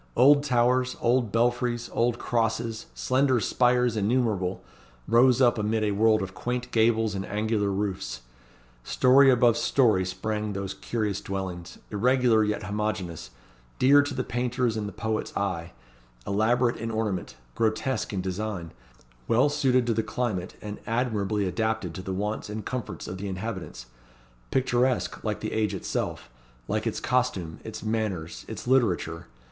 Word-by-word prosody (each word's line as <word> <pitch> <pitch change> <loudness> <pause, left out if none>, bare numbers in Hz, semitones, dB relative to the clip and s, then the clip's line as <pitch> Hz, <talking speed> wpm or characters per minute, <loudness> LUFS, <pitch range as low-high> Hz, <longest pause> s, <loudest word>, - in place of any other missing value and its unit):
Old 145 +2 +6
towers, 125 -1 +2
old 120 -2 +2
belfries, 120 +1 +1
old 120 0 +1
crosses, 115 -1 -1
slender 130 -1 +2
spires 125 0 +2
innumerable, 105 -4 0 0.4
rose 125 +2 +5
up 120 -2 +4
amid 110 +1 0
a 105 - +1
world 110 +1 +3
of 95 0 -6
quaint 125 +3 -3
gables 110 -1 +2
and 95 -1 -3
angular 105 0 0
roofs. 95 -11 -3 0.6
Story 135 - +5
above 120 -2 +4
story 110 -9 +3
sprang 105 +3 -3
those 100 0 -4
curious 105 0 -2
dwellings; 95 -3 -5
irregular 120 +1 +3
yet 105 0 -1
homogeneous; 100 - -3 0.5
dear 140 +3 +6
to 145 -1 -4
the 130 - -1
painter's 120 -1 -1
and 105 -2 -2
the - - -6
poet's 110 -1 -3
eye; 90 -4 -2 0.5
elaborate 120 +4 +2
in 115 - -4
ornament; 110 -5 -2 0.2
grotesque 110 - -1
in 95 -3 -2
design; 95 -2 -4 0.6
well 130 +6 +4
suited 130 -3 +2
to 120 - +1
the 110 - +1
climate, 110 -8 -3
and 105 0 -6
admirably 110 -4 0
adapted 110 -3 -1
to 95 - -6
the 95 - -5
wants 105 +3 -3
and 105 0 -5
comforts 125 -2 -5
of 95 - -6
the 100 - -4
inhabitants; 95 - -5 0.6
picturesque 125 -1 0
like - - -2
the - - -3
age 110 -1 0
itself, - - -4 0.4
like - - -1
its - - -2
costume, 120 -10 -1
its - - -7
manners, 110 -7 -3
its - - -7
literature. 90 -10 +1
110 Hz, 145 wpm, -26 LUFS, 100-120 Hz, 0.6 s, Old